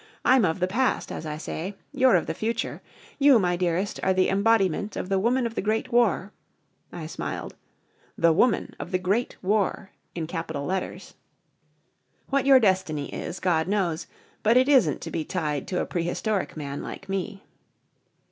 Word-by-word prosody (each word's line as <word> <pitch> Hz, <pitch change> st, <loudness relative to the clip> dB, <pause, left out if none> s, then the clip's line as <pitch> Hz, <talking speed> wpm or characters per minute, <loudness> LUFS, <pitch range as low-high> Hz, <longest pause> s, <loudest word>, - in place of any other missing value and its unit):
I'm 255 Hz, -4 st, +5 dB
of 160 Hz, +1 st, -1 dB
the 180 Hz, -, +2 dB
past, 250 Hz, +7 st, 0 dB
as 160 Hz, -, -5 dB
I 150 Hz, 0 st, -4 dB
say. 180 Hz, +5 st, -5 dB, 0.2 s
You're 260 Hz, -3 st, +4 dB
of -, -, +2 dB
the -, -, -3 dB
future. 230 Hz, +1 st, -3 dB, 0.4 s
You, 280 Hz, -3 st, +7 dB
my 180 Hz, -4 st, +1 dB
dearest, 180 Hz, +2 st, -1 dB
are 190 Hz, -, +2 dB
the 185 Hz, -, +3 dB
embodiment 200 Hz, -1 st, +2 dB
of 185 Hz, -, -4 dB
the 195 Hz, -1 st, +2 dB
woman 240 Hz, +5 st, +1 dB
of 230 Hz, -, -3 dB
the -, -, -2 dB
Great 215 Hz, +3 st, -1 dB
War 215 Hz, -4 st, +2 dB, 0.3 s
" -, -, -45 dB, 0.3 s
I 165 Hz, -, -7 dB
smiled 155 Hz, -, -5 dB, 0.6 s
"The 165 Hz, -1 st, +4 dB
Woman 220 Hz, +6 st, +2 dB
of -, -, -6 dB
the 185 Hz, -, +2 dB
Great 195 Hz, +7 st, -1 dB
War 200 Hz, 0 st, 0 dB, 0.2 s
in 165 Hz, -2 st, -2 dB
capital 160 Hz, -3 st, -4 dB
letters. 190 Hz, +2 st, -4 dB, 1.2 s
What 275 Hz, 0 st, +1 dB
your 270 Hz, -1 st, +8 dB
destiny 185 Hz, -, 0 dB
is, 175 Hz, -, -5 dB
God 165 Hz, -3 st, +1 dB
knows. 185 Hz, -5 st, -1 dB, 0.3 s
But 225 Hz, +3 st, +4 dB
it 260 Hz, +1 st, +4 dB
isn't 255 Hz, -, +4 dB
to -, -, -6 dB
be 160 Hz, -, -2 dB
tied 150 Hz, -5 st, -3 dB
to 180 Hz, -, -1 dB
a -, -, -1 dB
Prehistoric 180 Hz, +3 st, -2 dB
Man 140 Hz, -2 st, -5 dB
like -, -, -8 dB
me." 195 Hz, +1 st, -4 dB
190 Hz, 175 wpm, -26 LUFS, 170-225 Hz, 1.2 s, your